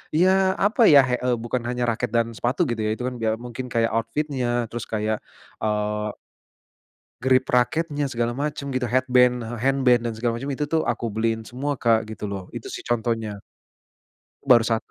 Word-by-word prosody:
iya 190 +2 +4
apa 215 +4 +2
ya 145 -2 +8
he 125 -1 0
eee, 125 -1 +1
bukan 120 +1 -2
hanya 125 0 -2
raket 120 +2 -3
dan 115 0 +2
sepatu 125 +9 0
gitu 120 -2 -3
ya 110 0 0
itu 125 - -6
kan 125 - -4
biar 110 -1 +1
mungkin 125 +1 -6
kayak 115 -1 +1
outfit-nya 120 -1 -1
terus 120 -1 -5
kayak, 110 0 -1 0.4
eee 105 0 -1 1.1
Grip 130 0 +3
raketnya 145 +3 +1
segala 120 -2 -1
macam 140 0 -3
gitu, 130 -1 -1
headband, 125 -1 +3
eee, 120 +1 -6
handband 125 -3 +3
dan 115 - -4
segala 115 0 -1
macam 140 - -5
itu 150 - -2
tuh 160 +2 0
aku 115 -2 -2
beliin 110 0 -1
semua, 140 +5 -3
Kak, 110 -2 +2
gitu 110 -1 -7
loh. 95 -2 -6
Itu 120 - -6
sih - - -5
contohnya. 115 -3 -1 1.1
Baru 120 -2 +7
satu 115 -1 -1
120 Hz, 180 wpm, -24 LUFS, 115-130 Hz, 1.1 s, ya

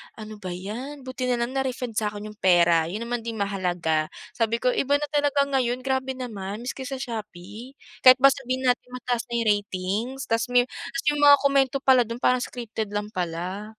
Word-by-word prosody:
"Ano 215 -1 -9
ba 185 - -7
'yan," 225 +11 -6
buti 255 -1 -4
na 250 - +2
lang 240 - -3
na-refund 260 -2 -2
sa'kin 210 -1 -2
yung 210 - -19
pera, 170 -3 +4
yun 210 +6 -4
naman 240 +1 -2
din 230 0 -6
mahalaga. 180 -6 -1 0.2
Sabi 230 -1 0
ko, 250 - +4
"Iba 280 +3 +1
na 295 0 -2
talaga 290 -1 +2
ngayon, 255 -3 -1
grabe 265 0 -1
naman 215 -4 -6
maski 260 +1 -5
sa 270 - -4
Shopee, 220 0 -7 0.2
kahit 255 0 +9
pa 275 +1 +6
sabihin 255 0 -3
natin 250 -1 +1
mataas 245 -1 -2
na 235 -1 -1
ratings" 205 +5 -1
tapos 230 0 0
me 245 - +7
tapos 275 +2 -7
may 295 - -3
mga 290 -1 +8
komento 275 -1 +3
pala 255 -4 +5
dun, 230 +1 -6
parang 255 0 +4
scripted 230 -3 -5
lang 210 0 -3
pala. 185 +4 -4
235 Hz, 190 wpm, -25 LUFS, 205-260 Hz, 0.2 s, kahit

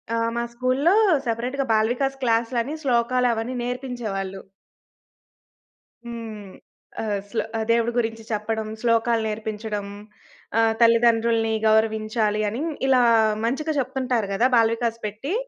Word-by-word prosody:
ఆ! - - +1 0.2
మా 235 - 0
స్కూలులో 255 +7 +2 0.3
సెపరేట్‌గా 250 +4 -2
బాల 215 0 +4
వికాస్ 270 +1 -1
క్లాసులని 235 +3 0
శ్లోకాలవన్నీ 245 -1 +1
నేర్పించేవాళ్ళు. 240 -7 -4 1.7
హ్మ్. 220 -4 -7 0.5
ఆహ్, 205 -2 -1
శ్లో 225 - -1
ఆహ్ 220 - -2
దేవుడు 235 0 +2
గురించి 225 -1 -1
చెప్పడం 220 +1 -2
శ్లోకాలు 230 -1 +2
నేర్పించడం. 215 -1 -4 0.7
ఆహ్ 225 0 +3
తల్లిదండ్రులని 230 -1 +3
గౌరవించాలి 215 0 +1
అని 230 +6 -4 0.3
ఇలా 260 -2 +5 0.4
మంచిగా 305 +6 -1
చెప్తుంటారు 255 -4 -1
గదా! 235 +6 +3
బాల 230 -1 +5
వికాస్ 230 -1 -2
పెట్టి. 220 - -4
230 Hz, 110 wpm, -23 LUFS, 220-245 Hz, 1.7 s, ఇలా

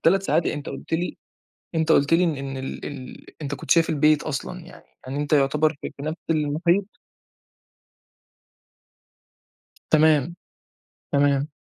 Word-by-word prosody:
3 195 +3 +4
ساعات 170 -3 +1
إيه، - - 0
أنت 145 -2 -6
قُلت 135 +3 -8
لي 175 +2 -1 0.6
أنت 160 0 +2
قُلت 145 +3 +3
لي 180 +2 +4
إن 135 -4 -2
ال 130 0 -6
ال 130 -3 -9 0.2
أنت 145 0 -3
كنت - - -10
شايف 165 -1 +5
البيت 150 0 +3
أصلًا 160 +5 -4
يعني، 165 - -15 0.2
يعني 135 +2 -5
أنت 145 +1 -3
يعتبر 150 +2 +3
في - - -6
في 140 - -9
نفْس 155 +3 -3
المحيط. 165 +6 +1 2.9
تمام، 155 +1 +4 0.8
تمام. 140 +1 +2
150 Hz, 140 wpm, -24 LUFS, 140-165 Hz, 2.9 s, شايف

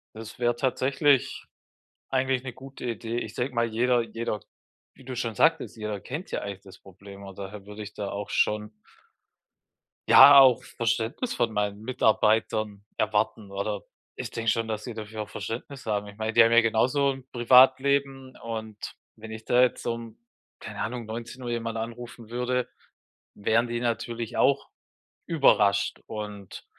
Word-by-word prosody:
Das 110 +2 -10
wäre 120 -1 +2
tatsächlich 135 +2 +1 0.6
eigentlich 130 -1 +1
'ne 130 -2 -6
gute 135 +1 -10
Idee. 115 0 -3
Ich 110 -3 -7
denke 125 +2 -2
mal, 115 -1 +2
jeder 120 +2 +2
jeder 115 -1 -4 0.6
wie - - -17
du 130 0 -6
schon 115 -3 -3
sagtest, 160 +8 +2
jeder 105 -2 -4
kennt 150 - -7
ja - - -2
eigentlich 100 -1 -6
das 95 -2 -14
Problem, 100 +1 -13
und 95 -1 -11
daher 100 0 -8
würde 105 +1 -9
ich 105 - -10
da 100 -2 -4
auch 100 0 -5
schon 105 0 0 1.4
ja, 140 0 +10
auch 130 -3 +6
Verständnis 115 - -2
von 120 -2 0
meinen 105 0 -2
Mitarbeitern 110 -3 +1
erwarten, 105 -1 -1
oder 100 +1 -3 0.3
ich - - -6
denke 115 -1 -1
schon, 115 +1 0
dass 110 -1 -4
sie 120 -3 -7
dafür 110 0 -6
auch 105 - -14
Verständnis 130 +6 -6
haben. 105 -1 -1
Ich 100 - -12
meine, 110 0 -2
die 115 - +8
haben 115 - +3
ja 115 0 +7
genauso 130 +5 +2
'n 130 -1 -9
Privatleben 130 +2 +4
und 110 -2 -6 0.2
wenn 110 0 -10
ich 110 0 -8
da 125 +1 +4
jetzt 125 - +1
um 115 -1 -4 0.4
keine - - -7
Ahnung, 120 +1 -4
19:00 120 +2 -6
jemanden 115 -1 -3
anrufen 115 0 -8
würde, 125 +1 -1 0.7
wären 110 +3 +1
die 120 0 -3
natürlich 115 -1 -3
auch 140 +1 +2 0.6
überrascht. 120 - +3
Und 105 -3 -7
115 Hz, 160 wpm, -26 LUFS, 105-125 Hz, 1.4 s, ja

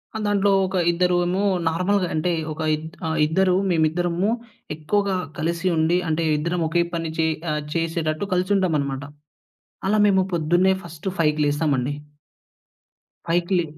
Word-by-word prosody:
ఆహ్, 220 - -3
దాంట్లో 205 -1 +2
ఒక 190 +1 -4 0.2
ఇద్దరేమో 180 +2 +1 0.3
నార్మల్‌గా 180 +3 +1
అంటే, 170 +3 0 0.2
ఒక 160 - -7
ఇద్ 155 +1 -8 0.4
ఇద్దరు 185 +3 +2
మేము 160 -3 +3
ఇద్దరము 175 +3 0 0.5
ఎక్కువగా 195 +5 0 0.2
కలిసి 170 +3 -1
ఉండి. 160 +2 +3
అంటే, 160 +1 0
ఇద్దరం 170 +3 -1
ఒకే 170 +2 +2
పని 165 -1 -2
చే 160 - +3 0.2
ఆహ్, 150 0 -1
చేసేటట్టు 165 +1 -1
కలిసి 185 +3 +1
ఉంటాం 185 -4 +1
అన్నమాట. 140 0 -3 0.8
అలా 210 - +2
మేము 190 -2 +4
పొద్దున్నే 175 +4 +3
ఫస్ట్ 170 +2 -6
5కి 150 -2 +2
లేస్తాం 145 0 +1
అండి 140 +4 -2 1.3
5కి 175 +2 0
లే - - +1
170 Hz, 145 wpm, -23 LUFS, 160-185 Hz, 1.3 s, మేము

